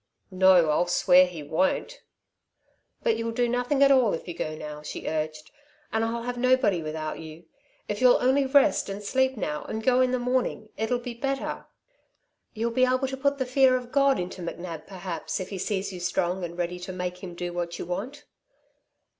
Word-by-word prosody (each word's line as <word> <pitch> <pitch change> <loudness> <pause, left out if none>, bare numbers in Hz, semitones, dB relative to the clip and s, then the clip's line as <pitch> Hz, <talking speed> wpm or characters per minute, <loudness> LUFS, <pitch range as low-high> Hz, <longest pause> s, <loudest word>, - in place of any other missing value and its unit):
"No, 185 -4 +5
I'll 175 +4 +2
swear 180 +1 +5
he 170 -4 -8
won't!" 190 - -1 1.0
"But 465 -2 +2
you'll 230 0 -2
do 240 +1 +1
nothing 245 +4 +1
at 275 - +6
all 255 -8 +4
if 165 - -9
you 175 - -4
go 155 -1 -4
now," 150 -1 -7
she 150 - -7
urged, 155 0 -3 0.4
"and 225 0 +1
I'll 230 +1 -2
have 245 0 -4
nobody 255 -8 +3
without 155 0 -4
you. 160 +1 -10 0.4
If 210 +2 -3
you'll 250 -1 +7
only 265 +2 +3
rest 275 -6 +3
and 200 +1 -5
sleep 260 +4 +1
now 150 -7 -3
and 220 0 -4
go 255 +1 +4
in 255 - +3
the 255 - +1
morning, 250 -3 -1
it'll 225 +3 0
be 245 0 -6
better. 270 +3 -3 0.9
You'll 230 +2 -1
be 255 +2 +2
able 255 +1 +1
to 265 - -3
put 280 +1 0
the 260 - -1
fear 255 0 +4
of 245 -1 -8
God 275 0 +4
into 180 +1 -5
McNab 170 -1 -6
perhaps 185 -3 -5
if 185 - -5
he 195 - -5
sees 195 0 -2
you 180 - -7
strong 175 +1 -1
and 170 0 -6
ready 180 0 -2
to 180 +1 -6
make 180 0 -5
him 180 -2 -7
do 175 0 -4
what 175 -1 -3
you - - -5
want." 210 - -5
205 Hz, 200 wpm, -26 LUFS, 175-255 Hz, 1.0 s, you'll